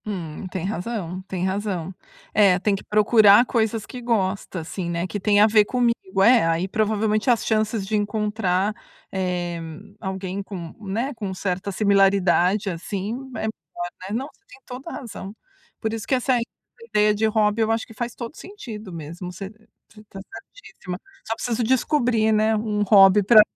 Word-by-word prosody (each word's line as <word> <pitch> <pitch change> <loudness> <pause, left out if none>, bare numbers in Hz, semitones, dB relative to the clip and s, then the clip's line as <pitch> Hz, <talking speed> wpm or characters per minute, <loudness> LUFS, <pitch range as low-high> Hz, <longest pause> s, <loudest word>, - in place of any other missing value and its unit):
Hum, 180 -4 -5
tem 185 -1 -4
razão, 190 -2 -4
tem 185 -1 -2
razão. 190 -2 -2 0.4
É, 200 -3 +5
tem 200 +1 +1
que 195 - -8
procurar 210 +1 +6
coisas 225 -3 0
que 250 - -9
gosta, 195 -6 -1
assim, 170 +2 -5
né, 170 +1 -1
que 205 +2 -4
tem 205 +1 +3
a 210 - +8
ver 215 -1 +5
comigo. 235 -6 0
É, 240 0 +6
aí 165 +3 0
provavelmente 215 +2 0
as 235 -2 +2
chances 215 -2 0
de 215 - -1
encontrar, 210 -2 0 0.4
eh, 180 -2 -2 0.4
alguém 190 -1 -4
com, 175 -5 -8
né, 230 +9 -2
com 210 -5 -5
certa 185 +1 -3
similaridade, 195 -1 +3
assim, 190 +3 -4 0.2
é - - -4
melhor, 350 +11 -5
né. 185 - -7
Não, 250 +6 -2
você 400 - -34
tem - - -15
toda 255 +6 -8
a - - -7
razão. 205 -4 -8 0.4
Por 220 -1 -2
isso 225 0 -4
que 265 - +2
essa 255 0 +1 0.5
ideia 210 -2 +2
de 210 +1 0
hobby, 215 0 +2
eu 220 0 +2
acho 225 0 0
que - - -14
faz 240 +1 -4
todo 240 +5 -7
sentido 225 - -9
mesmo, 170 +2 -7
você 190 +2 -7 0.4
você 215 - -14
tá 195 - -11 0.4
certissíma. 180 - -8 0.3
Só 225 - -1
preciso 235 0 -2
descobrir, 240 -2 +2
né, 215 +1 +3
um 210 -1 -1
hobby 195 0 +7
pra 215 +2 +8
210 Hz, 175 wpm, -23 LUFS, 190-225 Hz, 0.5 s, a